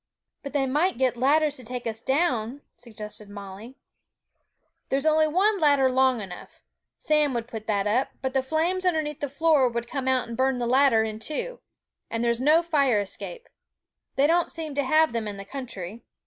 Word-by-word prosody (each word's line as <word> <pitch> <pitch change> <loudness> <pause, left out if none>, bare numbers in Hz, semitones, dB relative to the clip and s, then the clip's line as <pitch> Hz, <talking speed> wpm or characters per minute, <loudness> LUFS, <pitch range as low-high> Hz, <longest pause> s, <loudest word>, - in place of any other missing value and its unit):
'But 280 -1 -8
they 280 -2 +1
might 300 +7 +1
get 255 -1 +1
ladders 290 +4 +2
to 255 - -11
take 245 +1 -6
us 225 -1 -4
down,' 265 -2 0
suggested 215 -3 -10
Molly. 205 +4 -9 1.1
'There's 275 +2 0
only 310 0 +4
one 390 +6 +2
ladder 285 -4 +4
long 260 -2 +3
enough. 185 -3 -10 0.3
Sam 300 -3 +1
would 235 -1 -3
put 220 -3 -8
that 205 -2 0
up, 230 +6 +1
but 265 -1 -3
the 265 - +2
flames 325 +7 -1
underneath 310 -4 0
the 285 - -3
floor 285 -2 +3
would 235 0 -4
come 265 0 -4
out 260 -2 +1
and 235 - -6
burn 260 +1 +1
the 245 - -2
ladder 255 -2 +4
in 215 -1 -4
two; 310 - -4 0.5
and 230 +1 -2
there's 235 0 +1
no 310 +5 +4
fire 280 -9 +2
escape! 470 - -7 0.7
They 275 - +3
don't 340 +3 +2
seem 315 -3 -5
to 285 0 0
have 310 0 +3
them 230 -2 -2
in 205 -1 -5
the 195 - -8
country. 230 -4 -7
265 Hz, 190 wpm, -26 LUFS, 230-300 Hz, 1.1 s, only